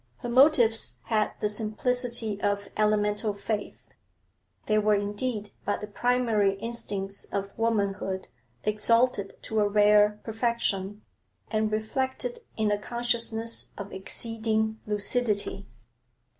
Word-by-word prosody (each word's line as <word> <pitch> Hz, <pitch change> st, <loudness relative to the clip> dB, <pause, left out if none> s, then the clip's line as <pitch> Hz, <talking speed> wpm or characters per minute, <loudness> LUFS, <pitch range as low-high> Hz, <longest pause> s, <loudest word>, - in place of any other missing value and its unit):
Her 240 Hz, -, -5 dB
motives 245 Hz, -3 st, +4 dB
had 215 Hz, -2 st, +1 dB
the -, -, +2 dB
simplicity 220 Hz, 0 st, -1 dB
of 205 Hz, 0 st, 0 dB
elemental 210 Hz, 0 st, +1 dB
faith; 205 Hz, +1 st, -3 dB, 0.9 s
they 215 Hz, 0 st, +3 dB
were 210 Hz, 0 st, +3 dB
indeed 205 Hz, +1 st, -2 dB
but 205 Hz, -, -1 dB
the -, -, -5 dB
primary 220 Hz, -2 st, +2 dB
instincts 200 Hz, -3 st, -4 dB
of 200 Hz, 0 st, -4 dB
womanhood 200 Hz, -4 st, -1 dB, 0.4 s
exalted 215 Hz, 0 st, +2 dB
to 220 Hz, -, -1 dB
a 205 Hz, -, +4 dB
rare 210 Hz, 0 st, +5 dB
perfection 215 Hz, -3 st, -1 dB, 0.5 s
and 215 Hz, -1 st, +1 dB
reflected 260 Hz, -, -2 dB, 0.2 s
in 215 Hz, -1 st, +2 dB
a 205 Hz, -, +1 dB
consciousness 230 Hz, 0 st, -1 dB
of 200 Hz, 0 st, -7 dB
exceeding 220 Hz, +2 st, -1 dB
lucidity. 210 Hz, -1 st, -1 dB
215 Hz, 110 wpm, -28 LUFS, 205-230 Hz, 0.9 s, rare